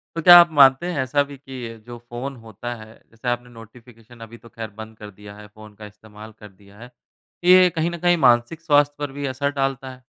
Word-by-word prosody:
तो 165 - -3
क्या 175 +2 +9
आप 170 -1 +4
मानते 135 +4 +5
हैं 160 - -4
ऐसा 140 +2 0
भी 140 0 -12
कि 130 -3 -9
अ, - - -15
जो 120 +2 -12
फ़ोन 120 +3 -8
होता 110 +3 -8
है, 110 -1 -14 0.2
जैसे 115 +2 -11
आपने 120 0 -4
नोटिफिकेशन 115 0 -17
अभी 115 +2 -14
तो - - -14
खैर 115 -1 -8
बंद 110 0 -12
कर 105 -1 -11
दिया 105 0 -12
है 105 0 -13
फ़ोन 110 0 -16
का - - -8
इस्तेमाल 105 +1 -14
कर 105 - -13
दिया 100 +1 -21
है। 125 +1 -13 0.5
ये 180 +1 +6
कहीं 165 +1 -1
न 170 - -6
कहीं 175 0 +3
मानसिक 120 +7 +1
स्वास्थ्य 145 -2 +2
पर 145 -2 -5
भी 140 - -4
असर 140 +2 -2
डालता 135 -1 -3
है। 130 0 -16
120 Hz, 235 wpm, -21 LUFS, 110-140 Hz, 0.5 s, क्या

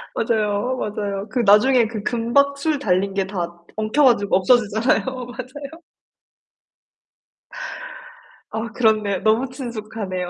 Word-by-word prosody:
맞아요, 220 +2 0
맞아요. 205 -1 -3
그 250 - -2
나중에 230 +3 +5
그 215 -2 -6
금박 280 +4 +1
술 300 +1 0
달린 195 -5 0
게 195 -1 +1
다 175 -3 -5
엉켜 215 +7 +1
가지고 205 -7 +3
없어지잖아요. 220 +3 +2
맞아요. 260 +5 -7 2.7
아, 225 +2 -4
그렇네요. 215 -5 +1
너무 225 +4 +2
친숙하네요. 215 -7 -5
220 Hz, 255 characters per minute, -21 LUFS, 205-255 Hz, 2.7 s, 나중에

